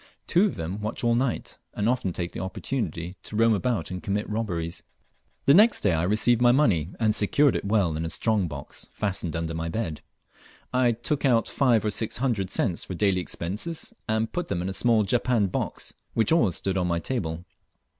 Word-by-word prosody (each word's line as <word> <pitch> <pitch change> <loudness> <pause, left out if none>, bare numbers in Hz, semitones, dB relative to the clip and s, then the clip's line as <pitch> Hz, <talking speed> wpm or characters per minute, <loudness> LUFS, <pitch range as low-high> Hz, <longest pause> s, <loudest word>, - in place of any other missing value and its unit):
Two 180 +4 +4
of - - -4
them 90 +6 -4
watch 105 +3 -3
all 120 0 +3
night, 120 +1 -1 0.2
and 105 - 0
often 120 -6 +1
take 85 0 -4
the - - -6
opportunity 95 -2 -4
to 105 - -8
roam 115 +1 +4
about 105 -4 -1
and 90 0 -5
commit 105 +1 -2
robberies. 90 -6 -3 0.6
The 140 - +6
next 215 +7 +6
day 100 - +2
I 80 - +1
received 110 +6 +2
my 120 0 +6
money, 100 - +2
and 110 -2 +3
secured 130 +7 +3
it - - -2
well 100 -6 +2
in 80 - -2
a 80 - -2
strong 105 0 0
box 70 -3 -9
fastened 95 -5 -2
under 85 -1 -2
my 80 0 -3
bed. 80 -5 -3 0.7
I 125 -2 +3
took 130 +6 -2
out 120 -5 +3
five 120 -6 +2
or 105 - +1
six 110 +2 -2
hundred 115 -7 0
cents 85 -3 0
for 95 - -6
daily 95 -1 +2
expenses, 105 - -5 0.2
and 110 +1 0
put 175 0 -2
them 85 - -2
in 95 - -2
a - - -3
small 115 +1 +3
japanned 115 -1 +1
box, - - -3 0.2
which 115 - +2
always 140 - +3
stood 95 -1 -1
upon 90 -1 +1
my 85 -1 +1
table. 85 -4 -3
105 Hz, 205 wpm, -26 LUFS, 90-120 Hz, 0.7 s, The